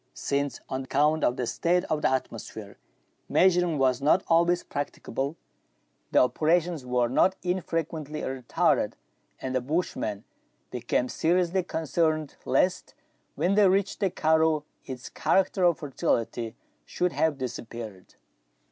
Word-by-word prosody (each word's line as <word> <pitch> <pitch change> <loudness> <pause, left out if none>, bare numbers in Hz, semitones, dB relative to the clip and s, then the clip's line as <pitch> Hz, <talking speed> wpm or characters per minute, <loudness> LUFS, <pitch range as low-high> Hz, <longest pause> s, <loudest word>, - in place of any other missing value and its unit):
Since, 140 0 -2
on 130 0 -4
account 150 +4 +2
of 120 - +2
the 125 - -1
state 175 +8 +1
ot 155 -1 +1
the - - +3
atmosphere, 110 -5 -5 0.5
measuring 180 -3 +3
was 130 -1 +2
not 155 +6 +3
always 170 +1 +3
practicable, 140 0 -4 0.7
the - - 0
operations 160 +4 +2
were 125 -1 +1
not 185 +10 +3
unfrequently 165 -4 -2
retarded, 130 -2 0 0.5
and 130 - -4
the 130 - +1
bush 155 +8 -1
man 105 -1 -3 0.5
became 125 0 -1
seriously 180 +5 +1
concerned 160 -2 -1
lest 185 - +1 0.4
when 185 - +1
they 205 -1 +5
reached 195 +1 +1
the 195 -2 +2
karroo 160 -2 +2 0.2
its 130 -1 -7
character 190 0 +1
of 175 -2 +4
fertility 115 -5 -2 0.3
should 180 - -1
have 160 -4 +1
dis 130 -3 -4
appeared. 110 -5 -9
155 Hz, 130 wpm, -27 LUFS, 125-175 Hz, 0.7 s, they